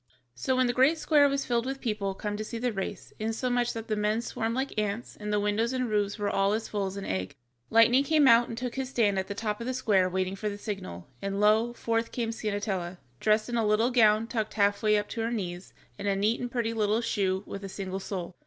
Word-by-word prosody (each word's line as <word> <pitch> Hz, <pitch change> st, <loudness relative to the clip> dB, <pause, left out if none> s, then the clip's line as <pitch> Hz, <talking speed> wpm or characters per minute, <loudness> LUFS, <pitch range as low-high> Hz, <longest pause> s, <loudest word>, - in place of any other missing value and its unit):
So 125 Hz, -, -1 dB
when 255 Hz, 0 st, +3 dB
the 245 Hz, -, +1 dB
great 270 Hz, +6 st, +4 dB
square 295 Hz, -3 st, +4 dB
was 275 Hz, 0 st, -1 dB
filled 235 Hz, 0 st, 0 dB
with 270 Hz, 0 st, -3 dB
people 210 Hz, -5 st, -2 dB
come 205 Hz, +1 st, -3 dB
to 215 Hz, -, -3 dB
see 230 Hz, +2 st, -6 dB
the 245 Hz, +1 st, -1 dB
race, 195 Hz, -1 st, -5 dB
insomuch 240 Hz, +2 st, 0 dB
that 225 Hz, -1 st, -6 dB
the 215 Hz, -, 0 dB
men 210 Hz, +2 st, 0 dB
swarmed 225 Hz, -1 st, -2 dB
like 265 Hz, +2 st, -2 dB
ants, 210 Hz, +3 st, -3 dB
and 210 Hz, 0 st, -5 dB
the 210 Hz, -, +2 dB
windows 210 Hz, +4 st, 0 dB
and 255 Hz, -1 st, 0 dB
roofs 205 Hz, 0 st, 0 dB
were 205 Hz, -1 st, -1 dB
all 195 Hz, 0 st, +2 dB
as 220 Hz, +1 st, -2 dB
full 200 Hz, -2 st, -2 dB
as 190 Hz, +1 st, -6 dB
an 200 Hz, -, -5 dB
egg, 95 Hz, +6 st, -3 dB, 0.3 s
Lightning 230 Hz, +4 st, +5 dB
came 300 Hz, -1 st, +4 dB
out 235 Hz, 0 st, +6 dB
and 230 Hz, -, -6 dB
took 250 Hz, 0 st, -3 dB
his 265 Hz, -1 st, -3 dB
stand 210 Hz, -7 st, +2 dB
at 190 Hz, -, -3 dB
the 200 Hz, -, -5 dB
top 210 Hz, 0 st, -3 dB
of 235 Hz, -, -4 dB
the 255 Hz, -, -1 dB
square 200 Hz, -7 st, +2 dB
waiting 185 Hz, +1 st, -1 dB
for 210 Hz, +2 st, -3 dB
the 205 Hz, -, -6 dB
signal, 90 Hz, -, -6 dB
and 195 Hz, 0 st, -2 dB
lo, 215 Hz, +3 st, +4 dB
forth 230 Hz, -1 st, -1 dB
came 230 Hz, -2 st, -2 dB
Ciennetella, 205 Hz, -5 st, -3 dB, 0.2 s
dressed 215 Hz, 0 st, +2 dB
in 240 Hz, -1 st, -2 dB
a 230 Hz, -, +2 dB
little 215 Hz, +3 st, +2 dB
gown 220 Hz, -2 st, +4 dB
tucked 225 Hz, -2 st, -3 dB
half 200 Hz, -1 st, +2 dB
way 210 Hz, -1 st, +4 dB
up 205 Hz, 0 st, -1 dB
to 230 Hz, -, -3 dB
her 225 Hz, -, 0 dB
knees, 185 Hz, -6 st, -4 dB, 0.3 s
and 205 Hz, -, -3 dB
a 200 Hz, -, +2 dB
neat 210 Hz, +4 st, +1 dB
and 245 Hz, -, -3 dB
pretty 230 Hz, -2 st, -1 dB
little 215 Hz, 0 st, +1 dB
shoe 190 Hz, -4 st, 0 dB
with 200 Hz, -, -7 dB
a 195 Hz, -, -5 dB
single 190 Hz, 0 st, -4 dB
sole. 185 Hz, -2 st, -5 dB
215 Hz, 255 wpm, -28 LUFS, 200-235 Hz, 0.3 s, out